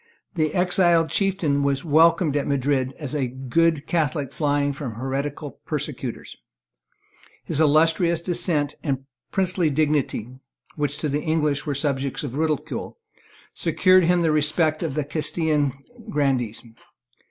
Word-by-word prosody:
The 155 -4 0
exiled 175 -2 +3
chieftain 180 -8 +1
was 140 +2 0
welcomed 160 0 +4
at 145 - 0
Madrid 135 -1 0
as 145 -4 -5
a 140 -4 0
good 140 +5 0
Catholic 145 -5 -1
flying 145 -1 0
from 135 -5 -6
heretical 140 +4 -4
persecutors. 145 -5 -5 1.1
His 150 - -1
illustrious 160 +3 +3
descent 165 -4 0
and 135 -3 -2 0.2
princely 185 -4 +1
dignity, 145 -6 0 0.5
which 145 -1 -2
to 155 - 0
the 145 +1 -1
English 150 -3 0
were 145 - -1
subjects 140 -1 -2
of 135 -4 -5
ridicule, 155 +1 -2 0.6
secured 185 0 +4
to 165 - +1
him 175 -1 +3
the 160 - +2
respect 155 +1 +1
of 160 -6 -3
the 150 - 0
Castilian 150 -1 0 0.4
grandees. 130 -6 0
150 Hz, 130 wpm, -23 LUFS, 140-165 Hz, 1.1 s, welcomed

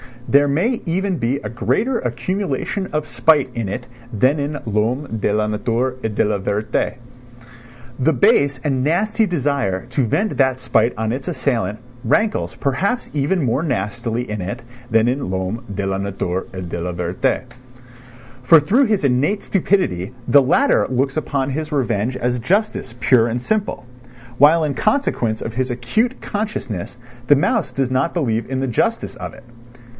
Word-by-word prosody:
There 145 +1 +4
may 195 - +1
even 185 +2 0
be 125 +2 0
a 105 - -6
greater 225 - 0
accumulation 190 0 -2
of 150 0 0
spite 130 +3 +3
in 115 -4 -3
it 125 +5 -4 0.3
than 130 +8 +2
in 145 +1 -2
l'homme 115 +4 -1
de 105 - +1
la 105 +1 +1
nature 115 +4 -1
et 110 -2 -2
de - - +3
la 105 -1 0
vérité. 100 +2 -1 1.0
The 160 +5 +3
base 140 +1 +3
and 135 -4 0
nasty 215 - +2
desire 140 - -1
to 130 -1 0
vent 205 - 0
that 130 -2 +2
spite 125 -1 +2
on 110 0 -1
its 130 +2 -4
assailant 120 - -1 0.3
rankles 215 - +1
perhaps 195 - -1
even 150 +4 +1
more 125 +3 +1
nastily 120 - -2
in 105 -2 -4
it 100 +7 -5 0.3
than 115 0 +3
in 130 -5 -2
l'homme 95 +5 -3
de 100 0 -2
la 95 0 -1
nature 95 -2 -3
et 95 -2 -5
de 85 - -4
la 90 +1 -3
vérité. 90 +6 -1 1.0
For 140 +6 +7
through 230 - +3
his 215 -7 +1
innate 140 +10 +1
stupidity 160 - 0
the 140 - +7
latter 175 - +3
looks 135 +3 0
upon 140 -3 -1
his 155 +3 -3
revenge 125 -3 0
as 125 0 -1
justice 195 - 0
pure 120 -3 +4
and 120 +1 -2
simple; 210 - -2 0.5
while 155 +4 +6
in 150 -2 0
consequence 125 - 0
of 115 - -5
his 130 +1 -1
acute 125 - -1
consciousness 125 - -4 0.3
the 145 - +7
mouse 205 - +1
does 135 -2 -1
not 130 +6 +1
believe 115 -9 -1
in 130 0 -1
the 135 - 0
justice 120 - 0
of - - -6
it. - - -14
130 Hz, 165 wpm, -20 LUFS, 115-155 Hz, 1.0 s, For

